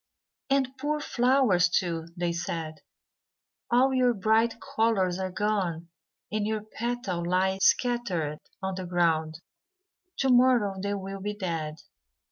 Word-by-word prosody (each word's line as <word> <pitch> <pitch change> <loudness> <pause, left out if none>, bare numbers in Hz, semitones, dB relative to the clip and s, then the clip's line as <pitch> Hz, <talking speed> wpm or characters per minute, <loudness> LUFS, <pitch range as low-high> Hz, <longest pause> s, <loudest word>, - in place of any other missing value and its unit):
"And, 270 -1 +1
poor 300 +2 -1
flowers, 245 -10 +3
too," 165 -2 -1
they 175 0 0
said, 165 -2 -4 0.9
"all 255 +3 +4
your 250 -2 +3
bright 220 +3 +2
colours 195 -7 0
are 190 0 -2
gone, 185 -4 -1 0.4
and 210 -1 -1
your 215 -1 -2
petals 215 -6 -3
lie 190 +2 +1
scattered 190 - +1 0.2
on 190 0 -1
the 185 -1 -5
ground; 165 -2 0 0.8
to 270 - +1
morrow 245 -5 +4
they 200 +1 -1
will 195 0 -6
be 210 +1 -3
dead." 165 -6 -4
195 Hz, 125 wpm, -27 LUFS, 175-240 Hz, 0.9 s, all